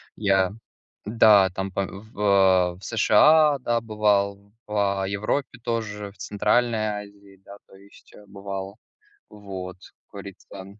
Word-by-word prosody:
Я, 95 -3 +1 0.5
да, 105 -3 +5
там 95 +1 -5
по 100 +1 -2
в 105 +2 -13
а, 95 -3 +3
в 95 - -19
США, 145 +7 +4
да, 120 -2 -1
бывал, 100 -2 -1
в, 100 -2 -1
а, 95 - -2
Европе 105 +6 -3
тоже, 105 -4 -4
в 100 - -25
Центральной 110 +3 0 0.3
Азии, 100 -1 -19
да, 100 0 -13
то - - -19
есть, 100 +1 -20
э, 105 - -16
бывал. 100 +1 -7 0.5
Вот, 95 -3 -9
как - - -61
говорится. 95 -1 -11
100 Hz, 140 wpm, -24 LUFS, 95-110 Hz, 0.5 s, да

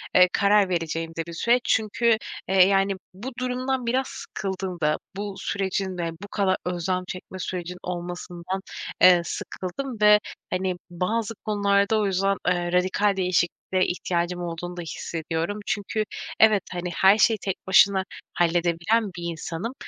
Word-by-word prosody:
eee, 180 0 +7
karar 200 -1 +4
vereceğim 165 -1 -2
de 165 - -2
bir 170 - -7
süreç. 240 +8 +2
Çünkü, 225 +1 +2 0.3
eee, 190 -1 +6
yani, 195 0 +3 0.2
bu 220 +8 -7
durumdan 255 0 -1
biraz 255 +3 +1
sıkıldım 190 -2 -5
da, 150 0 +2 0.2
bu 200 0 -4
sürecin 190 -1 -2
de, 170 -1 -2
bu - - -6
kadar 195 -2 +1
özlem 180 +1 -1
çekme 185 +1 -7
süreci 180 -1 -4
olmasından, 175 +1 -5 0.4
eee, 180 -1 +8
sıkıldım 220 +9 -5
ve, 210 0 +7 0.3
hani, 185 0 -1
bazı 210 +6 -1
konularda 200 0 +2
o 210 - +1
yüzden, 195 0 +1
eee, 175 -1 +1
radikal 190 +3 +2
değişikliğe 180 -2 +1 0.3
ihtiyacım 175 0 -1
olduğunu 175 +1 -5
da - - -3
hissediyorum 165 +3 -3
çünkü, 215 +1 -1 0.4
evet, 215 -3 +6
hani, 180 0 -3
her 195 +2 +6
şeyi 220 +1 +4
tek 195 -2 -2
başına 190 0 +5 0.3
halledebilen 175 +6 +2
bir 175 - -6
insanım 170 +8 -5
190 Hz, 145 wpm, -25 LUFS, 175-205 Hz, 0.4 s, eee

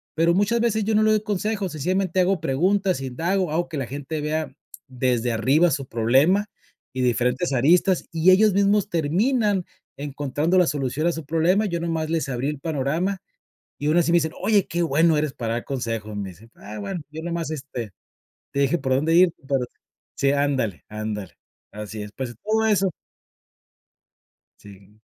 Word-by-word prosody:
Pero, 165 +2 +3
muchas 205 +5 +2
veces, 220 -2 +1
yo 220 0 +1
no 215 - +4
le 215 - +4
doy 215 -1 +2
consejos, 205 -1 -2
sencillamente 185 +4 -1
hago 185 -1 +1
preguntas, 185 +5 +1
indago, 165 +7 -1
hago 170 +2 -1
que 155 - -5
la 135 - -2
gente 145 +4 -5
vea 155 -1 -2 0.4
desde 125 -2 0
arriba 135 +10 +3
su 135 -1 -2
problema 135 - +3 0.5
y 130 - -2
de 125 - +3
diferentes 125 +7 0
aristas, 170 +8 +3
y 165 +3 +4
ellos 210 +2 +5
mismos 200 +1 +2
terminan 195 - +1 0.3
encontrando 145 +4 -1
la 180 - +5
solución 140 +2 -1
a - - +3
su 165 - -6
problema, 165 +7 +2
yo 170 -3 -2
nomás 165 -2 -2
les 165 -2 -1
abrí 130 +2 -1
el 150 -2 -5
panorama, 160 +6 -1 0.6
y, 145 - -2
aun 155 +3 +3
así, 170 -1 +3
me 175 - +5
dicen: 160 -1 0
"Oye, 205 -4 +2
qué 170 +2 -2
bueno 160 +1 +3
eres 150 -1 0
para 115 -2 -3
dar 120 - -3
consejos", 115 -5 -4
me 100 -2 -4
dicen, 105 +7 -17
ah, 105 +1 -9
bueno, 105 - -4
yo 160 +1 -7
nomás, 170 -2 -3
este, 130 -7 -6 0.6
te 140 - -2
dije 140 +5 +2
por 130 -2 0
dónde 155 +5 +2
ir, 180 -1 +5 0.2
pero 135 -2 +2
sí, - - -45 0.4
sí, 140 0 +2
ándale 135 -9 0
ándale. 105 -2 -5 0.4
Así 105 +1 -7
es, 105 - -9
pues, 125 -3 -5
todo 220 +1 +1
eso. 195 -3 +3 1.7
Sí, 100 +1 -16
155 Hz, 180 wpm, -23 LUFS, 130-185 Hz, 1.7 s, ellos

